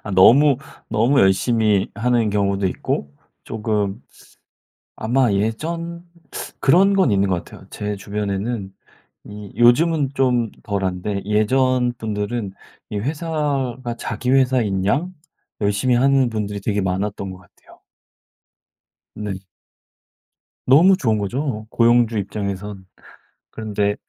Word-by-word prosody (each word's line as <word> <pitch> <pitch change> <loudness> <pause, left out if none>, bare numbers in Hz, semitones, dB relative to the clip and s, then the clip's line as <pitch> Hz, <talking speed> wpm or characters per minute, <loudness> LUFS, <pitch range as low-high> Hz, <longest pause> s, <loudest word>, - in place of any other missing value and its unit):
아 100 - -5
너무 135 +9 +6 0.3
너무 120 +6 +3
열심히 105 +1 +2
하는 115 -2 +1
경우도 100 -1 0
있고 70 -5 -3 0.3
쪼금 105 -1 -2 0.9
아마 120 +2 +1
예전 165 - -2 0.6
그런 190 +8 +4
건 190 - +3
있는 100 0 +2
것 90 -2 -1
같아요. - - -14
제 105 0 -4
주변에는 100 +1 -3 0.6
이 105 -1 -9
요즘은 140 +4 +4
좀 125 -4 +1
덜한데 100 0 -2
예전 125 +4 +2
분들은 105 -1 -3 0.4
이 105 - -3
회사가 135 -4 -2
자기 115 +3 -3
회사인양 130 - +1 0.5
열심히 105 +5 +1
하는 135 0 +3
분들이 105 -2 -3
되게 105 +1 -1
많았던 95 +1 -2
것 95 - -9
같아요. 90 -1 -21 1.4
네. 105 -2 -4 1.3
너무 170 +9 +6
좋은 110 - +1
거죠, 110 +2 -3
고용주 120 -1 +3
입장에선. 100 -1 -5 0.7
그런데 105 -2 -1
110 Hz, 230 characters per minute, -21 LUFS, 100-130 Hz, 1.4 s, 너무